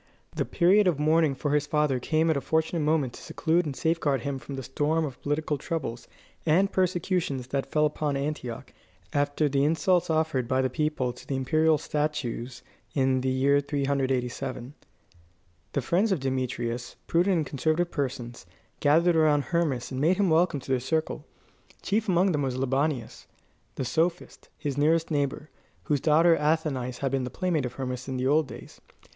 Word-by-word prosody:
The - - 0
period 190 +3 +4
of 170 -5 +2
mourning 155 -1 +3
for 145 +2 -2
his 150 0 +1
father 150 -4 +1
came 160 +5 +1
at - - +1
a 140 - -1
fortunate 160 +4 0
moment 150 -4 +1
to - - -11
seclude 165 +1 0
and 140 - -4
safeguard 155 -5 0
him 135 +1 -3
from 135 +2 -8
the 135 - -5
storm 150 +5 0
of 135 -4 -8
political 145 0 -1
troubles 130 -7 -4 0.4
and 185 +5 +3
persecutions 175 -8 -1
that 135 0 -2
fell 150 0 +3
upon 150 -1 -1
Antioch 135 -3 -5 0.4
after 145 +1 +1
the 140 0 +1
insults 175 +3 +2
offered 155 -6 0
by 130 +1 +1
the 130 -1 +1
people 145 -4 -1
to 125 - -14
the 135 - -2
imperial 155 +4 +2
statues 130 -5 -3 0.3
in 130 -2 +2
the 130 - 0
year 135 +2 +3
387. 135 -3 -2 1.0
The 140 - 0
friends 195 - +2
of 185 - +1
Demetrius, 125 -2 -3
prudent 180 +3 +2
and 155 - 0
conservative 155 +6 0
persons, 125 -4 -4 0.3
gathered 165 +4 +4
around 150 -2 +4
Hermas 140 -4 -1
and 130 0 -3
made 175 +5 +3
him 195 -4 +2
welcome 160 -2 +3
to 130 - -7
their 130 - +2
circle. 155 +5 -2 0.6
Chief 220 +2 0
among 185 +1 +3
them 150 -3 0
was 130 -2 -2
Libanius, 135 -1 -1 0.5
the 130 - -3
sophist, 170 +6 -2
his 145 -2 -3
nearest 160 +2 +2
neighbour, 145 0 -2 0.3
whose 145 -3 0
daughter 165 +2 +5
Athenais 150 -5 -1
had 135 -2 0
been 135 -1 0
the 125 - -3
playmate 160 -1 -1
of 120 - -9
Hermas 130 -1 -5
in 130 -1 -3
the 130 - -1
old 150 +2 +3
days. - - -11
145 Hz, 175 wpm, -27 LUFS, 130-160 Hz, 1.0 s, daughter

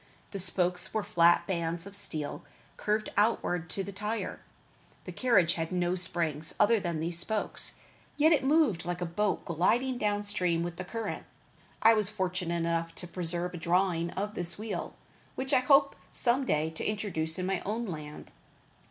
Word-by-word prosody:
The 200 - -4
spokes 180 0 0
were 215 - +1
flat 170 0 +4
bands 170 -2 -2
of 200 0 -7
steel, 155 -7 -3 0.3
curved 215 +1 -1
outward 180 -5 +1
to 195 - -3
the 200 - -6
tire. 210 +3 -3 0.7
The - - -6
carriage 200 -10 +3
had 165 +1 -3
no 180 -1 +1
spring 170 -4 0 0.2
other 220 +2 +5
than 170 -4 -2
these 165 +1 -2
spokes, 215 +4 0 0.4
yet 310 +2 +5
it 305 - +4
moved 270 - +3
like 175 0 -3
a - - 0
boat 200 +5 -1
gliding 240 - +1
down 205 -1 0
stream 180 -5 0
with 170 0 -5
the 185 - -4
current. 225 +2 -4 0.6
I 225 +1 +8
was 210 -3 +1
fortunate 185 -4 -2
enough 165 0 -1
to - - -8
preserve 175 0 -2
a - - -5
drawing 170 0 +1
of 205 +2 -3
this 175 -5 -4
wheel, 215 +1 -4 0.4
which 265 +2 -2
I - - +6
hope 275 +2 +4 0.2
some 255 +2 +1
day 155 -3 +1
to 160 - -6
introduce 185 -7 -1
in 185 - -2
my 190 -1 0
own 225 +4 -3
land. 150 -6 -7
185 Hz, 175 wpm, -30 LUFS, 170-215 Hz, 0.7 s, I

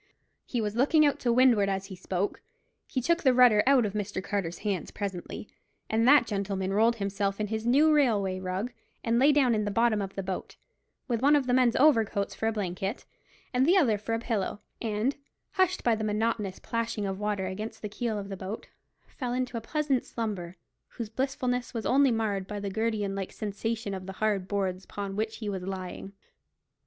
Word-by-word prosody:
He 240 - -1
was 210 0 -2
looking 300 +5 +4
out 285 - +2
to 240 - +1
windward 235 -5 +5
as 195 0 -2
he 195 -1 -8
spoke. 185 +2 -2 0.5
He 255 - -2
took 340 +5 +2
the 260 -3 +4
rudder 245 -4 +7
out 270 -4 +5
of 200 - -3
Mr. 205 -2 -3
Carter's 185 -5 -2
hands 195 -6 -1
presently, 200 0 -5 0.4
and 225 +2 +3
that 285 -2 +7
gentleman 195 -2 -2
rolled 225 +3 +4
himself 200 -1 -2
in 215 - 0
his 220 +1 -2
new 300 +5 +5
railway 205 -10 +2
rug, 190 +6 -3 0.3
and 230 0 +2
lay 280 +3 +6
down 275 -5 +4
in 215 -1 +1
the 205 - -1
bottom 225 0 +2
of 195 -1 -5
the 195 - -3
boat, 185 0 -5 0.5
with 235 -3 -1
one 285 +2 +5
of 285 -3 +2
the 250 - +1
men's 250 -2 +4
overcoats 225 -8 +3
for 220 - -2
a - - +2
blanket 195 +1 -3 0.5
and 250 +1 +3
the 350 +7 +5
other 255 - +4
for 225 +2 -2
a - - -2
pillow, 215 -3 -2 0.2
and, 225 +5 -1 0.3
hushed 370 -2 +1
by 235 - +4
the 220 0 -2
monotonous 210 -2 -1
plashing 230 -2 -2
of 195 -1 -2
the - - -10
water 205 -2 -1
against 210 +5 -6
the - - -1
keel 220 +1 -3
of 200 -1 -5
the 195 - -4
boat, 190 +3 -7 0.4
fell 250 -3 -5
into 250 -1 -2
a 230 - -2
pleasant 290 +1 0
slumber, 190 -6 -4 0.3
whose 230 -3 -6
blissfulness 250 0 -2
was 225 - -3
only 275 +1 +4
marred 210 -5 -1
by 210 0 -4
the 200 -1 -4
gridiron 215 -2 -1
like 195 -1 -4
sensation 215 0 -3
of 190 -1 -6
the 195 - -5
hard 200 -2 0
boards 190 -2 -1
upon 200 -1 -5
which 220 +1 -2
he 215 - -6
was 195 -2 -3
lying. 190 +1 -6
215 Hz, 205 wpm, -28 LUFS, 195-245 Hz, 0.5 s, rudder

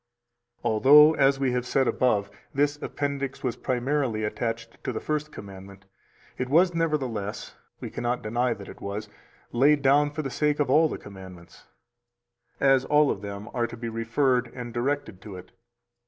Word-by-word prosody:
321 - - +1
Although 150 +7 +7
(as 135 0 +3
we 135 -2 +1
have 125 0 -2
heard 135 -2 +2
above) 105 -5 +1 0.2
this 145 +1 +1
appendix 140 -2 -3
was 125 -3 -1
primarily 130 -3 -1
attached 115 +2 -4
to 130 - -2
the 115 - -4
First 150 0 -3
Commandment, 95 -2 -11 0.5
it 125 0 -2
was 175 +5 +4
nevertheless 130 -11 -2 0.3
[we - - -7
cannot 120 +1 -2
deny 120 +2 0
that 100 -1 -11
it - - -12
was] 105 +1 -5 0.4
laid 140 +4 +3
down 145 +2 +4
for 155 +1 -5
the 135 - -4
sake 150 +1 0
of 145 -3 +1
all 155 +3 +5
the - - -4
commandments, 95 -4 -13 0.9
as 135 -1 +4
all 150 -1 +4
of 95 - -4
them 100 0 -7
are 120 -2 0
to 120 - -10
be 115 0 -5
referred 120 +2 0
and 120 -2 -7
directed 120 -5 -2
to 100 -3 -9
it. 90 0 -12
125 Hz, 170 wpm, -26 LUFS, 110-145 Hz, 0.9 s, Although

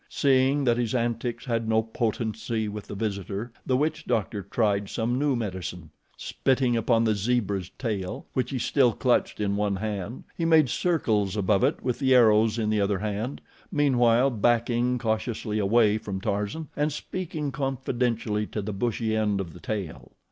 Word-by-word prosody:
Seeing 135 +1 +3
that 120 -2 +3
his 120 0 -1
antics 120 0 -2
had 115 -3 -1
no 110 0 +3
potency 110 0 -2
with 105 0 -6
the - - -6
visitor, 100 +1 -3 0.2
the 130 - +3
witch 155 +2 -1
doctor 105 -1 -1
tried 100 0 0
some 120 +2 -1
new 145 -2 +2
medicine. 90 -7 -5 0.3
Spitting 130 -2 +1
upon 115 0 +2
the 110 -1 +3
zebra's 100 -3 -1
tail, 105 -7 -3
which 130 - 0
he 135 - -2
still 125 -1 +3
clutched 125 +1 +1
in 100 -1 0
one 100 -1 0
hand, 105 +2 -4
he 170 - -3
made 160 -5 +5
circles 110 - 0
above 95 -1 +2
it - - +1
with 125 -2 -1
the 130 -2 +4
arrows 110 -2 +5
in 110 -2 0
the 105 -1 +2
other 100 0 +1
hand, 105 +5 -3 0.3
meanwhile 130 -3 +3
backing 120 +2 +1
cautiously 110 -1 -2
away 105 +1 +3
from 100 -3 -5
Tarzan 105 +9 -3
and 150 +1 0
speaking 155 -1 -4
confidentially 120 -6 -1
to 105 - -4
the 105 +1 -4
bushy 110 +1 -1
end 105 -2 +1
of 85 -4 -5
the 90 - -12
tail. 95 -7 -5
115 Hz, 170 wpm, -26 LUFS, 105-125 Hz, 0.3 s, made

